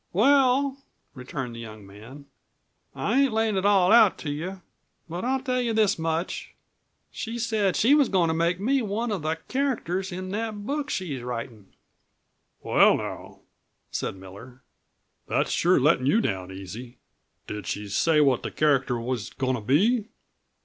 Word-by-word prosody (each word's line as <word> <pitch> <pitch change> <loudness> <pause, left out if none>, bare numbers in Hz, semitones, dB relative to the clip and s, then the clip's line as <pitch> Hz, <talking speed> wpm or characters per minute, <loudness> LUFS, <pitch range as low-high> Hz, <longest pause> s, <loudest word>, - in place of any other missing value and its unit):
"Well," 270 +5 +3 0.3
returned 125 -1 -6
the - - -8
young 110 -3 -10
man, 115 +9 -13 0.7
"I 245 +6 +1
ain't 275 -5 +2
layin' 220 -1 +1
it 190 +1 +1
all 195 -2 +4
out 225 -3 +6
to 145 - -4
you. 180 +5 -5 0.4
But 170 +2 -5
I'll 260 +2 0
tell 255 -2 -1
you 235 -2 -1
this 215 -5 +2
much; 165 +2 -3 0.6
she 230 0 -5
said 220 -5 0
she 245 +6 +4
was 290 -4 +4
goin' 180 -4 +2
to 160 - +1
make 170 +2 0
me 260 +6 +1
one 220 +2 -2
of 200 -5 -2
the 155 +1 -1
characters 210 -9 -1
in 185 +1 -5
that 210 -1 -4
book 290 +3 -2
she's 150 -9 -3
writin'." 115 -4 -7 0.9
"Well, - - +5
now," - - -7 0.5
said - - -3
Miller, 100 +8 -13 0.6
"that's - - 0
sure 180 -1 +3
lettin' 135 -1 +3
you 210 - +4
down 95 - -2
easy. 105 +7 -9 0.5
Did 105 -4 -6
she 105 0 -4
say 150 +10 +2
what 135 -4 +3
the - - -4
character 135 -5 +1
was 115 -3 -3
goin' 130 -1 -2
to 120 - -3
be?" 205 - +2
175 Hz, 165 wpm, -25 LUFS, -, 0.9 s, out